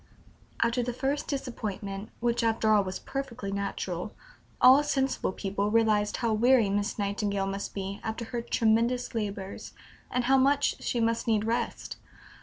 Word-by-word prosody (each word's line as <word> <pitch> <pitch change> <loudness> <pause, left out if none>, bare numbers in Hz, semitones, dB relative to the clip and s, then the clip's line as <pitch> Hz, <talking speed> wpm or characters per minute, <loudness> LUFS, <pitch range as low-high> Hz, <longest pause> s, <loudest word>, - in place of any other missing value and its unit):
" - - -5
After 235 +2 +1
the 245 0 -2
first 275 +4 -2
disappointment 210 -7 -4
which 235 0 +1
after 225 -1 +2
all 205 -1 +4
was 185 0 -4
perfectly 250 -7 -5
natural 200 -1 -3 0.4
all 260 +3 +8
sensible 270 -7 0
people 200 +2 -2
realized 215 -2 +2
how 230 -3 0
weary 230 -1 +4
Miss 205 +2 -1
Nightingale 200 -1 -1
must 195 +1 -4
be 195 +1 -4
after 225 +1 -4
her 235 +1 -4
tremendous 235 +2 +1
labors, 200 -3 -4 0.4
and 250 - 0
how 265 +2 +4
much 285 +2 +2
she 240 - -1
must 230 +1 0
need 215 -2 +2
rest. 230 +1 -2
225 Hz, 155 wpm, -28 LUFS, 200-245 Hz, 0.4 s, all